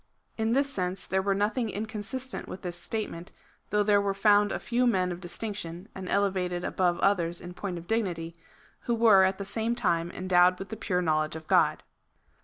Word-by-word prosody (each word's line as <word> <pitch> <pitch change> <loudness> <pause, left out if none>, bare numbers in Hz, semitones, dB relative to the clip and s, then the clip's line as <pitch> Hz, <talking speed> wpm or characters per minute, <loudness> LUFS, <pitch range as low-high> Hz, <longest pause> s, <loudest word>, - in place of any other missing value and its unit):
In 225 0 0
this 275 +2 +2
sense 185 -7 -3
there 190 0 0
were 195 0 +1
nothing 220 +4 0
inconsistent 220 +5 -5
with 190 - -8
this 175 -1 -4
statement, 175 -2 -5 0.4
though 210 0 +2
there 205 -1 +4
were 200 -1 -1
found 205 0 +4
a - - -1
few 245 +1 0
men 185 -6 +2
of 175 - -5
distinction, 175 -2 -5
and 190 -1 -7
elevated 185 -3 0
above 175 -2 +1
others 175 -4 +2
in 175 0 -9
point 185 -1 -5
of 170 - -9
dignity, 175 -6 -2 0.5
who 240 - +1
were 220 -4 +6
at 190 0 +2
the 200 - -5
same 225 +3 -1
time 170 -7 +1
en 185 - -5
dowed 180 0 +5
with 195 - -8
the 220 - -5
pure 180 -4 -1
knowledge 155 -1 +1
of 160 0 -8
God. - - +3
195 Hz, 200 wpm, -28 LUFS, 175-215 Hz, 0.5 s, were